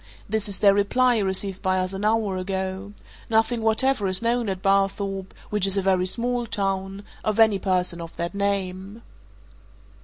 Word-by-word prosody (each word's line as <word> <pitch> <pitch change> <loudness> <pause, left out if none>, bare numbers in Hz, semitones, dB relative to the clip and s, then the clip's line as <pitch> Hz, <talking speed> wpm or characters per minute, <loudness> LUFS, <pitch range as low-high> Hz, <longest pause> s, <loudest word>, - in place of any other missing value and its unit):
This 215 0 -1
is 195 - 0
their 200 -1 +6
reply, 240 +4 +2
received 190 -1 -1
by 185 -1 +1
us 185 +1 -1
an 195 +1 -5
hour 215 -2 +1
ago. 190 +1 -4 0.4
Nothing 225 +1 +1
whatever 220 0 +2
is 185 +4 +4
known 235 -1 +1
at 190 -1 -4
Barthorpe 195 0 0 0.2
which 210 -2 +2
is 195 +1 -1
a 195 - +1
very 185 -1 +2
small 240 +3 0
town 195 -1 -2 0.2
of 215 +1 -1
any 220 -3 +5
person 180 -3 -1
of 165 -1 -8
that 170 +2 -4
name." 200 +1 -3
195 Hz, 165 wpm, -24 LUFS, 190-220 Hz, 0.4 s, their